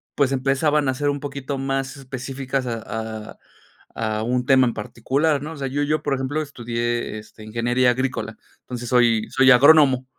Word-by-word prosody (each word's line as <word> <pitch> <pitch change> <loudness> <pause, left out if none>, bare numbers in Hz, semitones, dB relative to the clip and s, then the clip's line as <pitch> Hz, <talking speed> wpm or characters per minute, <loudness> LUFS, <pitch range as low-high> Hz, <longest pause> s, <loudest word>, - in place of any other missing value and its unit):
pues 140 -2 +2
empezaban 140 +2 +1
a 130 - +1
ser 145 +2 -1
un 145 - -1
poquito 140 -1 -5
más 135 0 -2
específicas 135 0 -4
a 115 -2 -3 0.5
a - - -33 0.6
a 110 -1 -2
un 125 +2 -1
tema 130 -2 +5
en 120 - -1
particular, 140 +7 -1
¿no?, 160 +2 -6
o - - -10
sea, 135 -1 -3
yo 145 +2 -1
yo, 155 +2 0
por 145 - 0
ejemplo, 135 +4 -2
estudié, 120 -5 -3
este, 110 0 -14
ingeniería 120 +3 +1
agrícola, 130 +1 -3 0.3
entonces, 120 -1 -7
soy 120 -3 +3
soy 135 0 +5
agrónomo. 135 -1 +6
130 Hz, 175 wpm, -22 LUFS, 120-140 Hz, 0.6 s, agrónomo